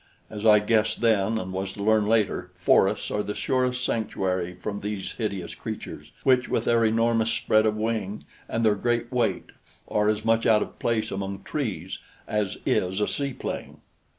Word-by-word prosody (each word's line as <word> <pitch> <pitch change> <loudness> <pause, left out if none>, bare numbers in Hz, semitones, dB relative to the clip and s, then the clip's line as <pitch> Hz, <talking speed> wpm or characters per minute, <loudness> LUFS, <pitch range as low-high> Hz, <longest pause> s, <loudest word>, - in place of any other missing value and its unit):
As 110 +1 -2
I 105 -1 +8
guessed 110 +1 +1
then 110 -1 +2
and 95 -3 -4
was 95 0 -3
to 100 - -6
learn 110 0 +3
later, 105 -5 +1
forests 90 - +2
are 105 - 0
the 105 0 -4
surest 125 -1 0
sanctuary 95 -5 -1
from 100 +3 -5
these 105 -2 -4
hideous 100 -6 -4
creatures, 75 +1 -7
which, 130 -2 +3
with - - 0
their 115 -1 +3
enormous 115 0 +2
spread 110 0 +2
of 105 0 0
wing 110 -2 -2 0.3
and 115 0 0
their 110 - +5
great 120 +3 -1
weight, 120 -3 0 0.4
are 105 0 +2
as 110 -1 -1
much 115 0 +3
out 110 -1 +5
of - - -12
place 110 -2 0
among 100 0 -4
trees 100 - -4 0.3
as 105 -3 -1
is 95 +2 +1
a 105 - +1
seaplane. 140 -3 -4
110 Hz, 175 wpm, -26 LUFS, 100-115 Hz, 0.4 s, I